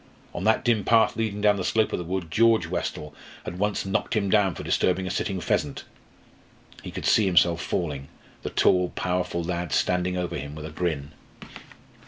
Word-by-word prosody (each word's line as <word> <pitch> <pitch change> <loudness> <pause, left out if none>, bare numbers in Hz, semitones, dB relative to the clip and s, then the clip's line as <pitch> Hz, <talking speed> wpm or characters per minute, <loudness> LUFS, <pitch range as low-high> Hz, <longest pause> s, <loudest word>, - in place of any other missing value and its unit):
On - - -4
that 110 - +2
dim 115 -4 +2
path 115 +3 +4
leading 110 -2 -2
down 105 -1 +4
the 95 - -3
slope 110 +4 +1
of - - -1
the - - -4
wood, 90 -2 -4
George 115 -3 +4
Westall 75 -3 -4 0.3
had 90 +1 -6
once 105 0 0
knocked 95 +4 -1
him 100 -3 0
down 100 -5 +3
for - - -7
disturbing 95 +1 +1
a 95 - -3
sitting 95 0 -2
pheasant. - - -1 1.0
He - - -8
could - - -6
see 105 -3 +4
himself 85 -2 +3
falling 70 -6 -3 0.3
the - - -4
tall, 90 -1 +3
powerful 90 -1 -1
lad 85 -1 -3
standing 90 0 +1
over 90 -1 -3
him 70 +2 -7
with 75 0 -7
a 80 - -7
grin. 80 -3 -3
90 Hz, 190 wpm, -25 LUFS, 85-105 Hz, 1.0 s, path